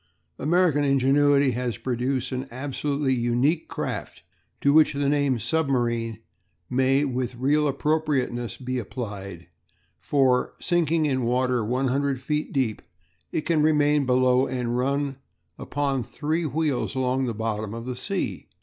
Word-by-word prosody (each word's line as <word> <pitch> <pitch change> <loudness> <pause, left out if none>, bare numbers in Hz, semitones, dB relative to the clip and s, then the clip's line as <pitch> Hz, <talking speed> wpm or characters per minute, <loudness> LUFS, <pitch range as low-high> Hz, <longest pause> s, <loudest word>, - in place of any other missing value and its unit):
American 160 -1 +2
ingenuity 140 0 +3
has 120 -3 -2
produced 130 +1 -2
an 130 0 -3
absolutely 140 +2 -1
unique 125 +7 +1
craft - - -5 0.4
to 140 - +3
which 155 0 +5
the 140 0 0
name 140 -3 +2
submarine 120 -3 0 0.5
may 130 +2 +3
with 125 -2 -2
real 145 +5 +2
appropriateness 140 -4 -1
be 130 -1 -3
applied, 100 -6 -6 0.5
for, 130 -3 +2
sinking 165 -2 +1
in 130 -3 0
water 125 0 +1
100 130 +3 0
feet 150 +3 -2
deep, 130 -7 -1 0.5
it - - -1
can 160 -1 +1
remain 150 -1 +3
below 130 +1 +3
and 120 -2 -2
run 140 +2 0 0.4
upon 140 -2 -1
three 155 +7 -2
wheels 145 -2 -1
along 130 0 0
the 120 - -2
bottom 110 -1 -3
of 115 0 -6
the 125 0 -4
sea. - - -3
130 Hz, 130 wpm, -25 LUFS, 125-145 Hz, 0.5 s, which